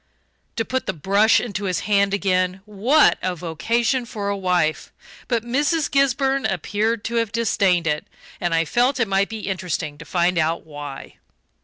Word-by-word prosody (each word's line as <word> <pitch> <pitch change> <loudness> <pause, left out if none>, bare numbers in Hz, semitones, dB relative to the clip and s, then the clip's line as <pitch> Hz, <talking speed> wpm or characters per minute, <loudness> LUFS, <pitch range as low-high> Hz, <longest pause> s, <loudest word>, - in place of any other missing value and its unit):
To 225 - -1
put 260 0 -2
the 190 - 0
brush 200 +7 +4
into 205 -4 -4
his 185 -2 -1
hand 200 -1 +2
again 185 -1 0
what 225 +9 +3
a 185 -1 -1
vocation 230 - 0
for 205 -4 -4
a 200 - 0
wife! 180 -5 0 0.4
But 235 -3 0
Mrs. 290 +6 0
Gisburn 275 0 +2
appeared 205 +5 -1
to 235 +1 -2
have 230 -3 0
disdained 195 -6 +1
it 150 -1 -1 0.3
and 175 -1 0
I 165 0 +2
felt 250 - +1
it 230 - +2
might 195 0 +1
be 220 -1 -6
interesting 170 -5 -3
to 165 - -10
find 175 +1 +1
out 160 +1 0
why. 145 -3 -9
200 Hz, 170 wpm, -22 LUFS, 175-235 Hz, 0.4 s, brush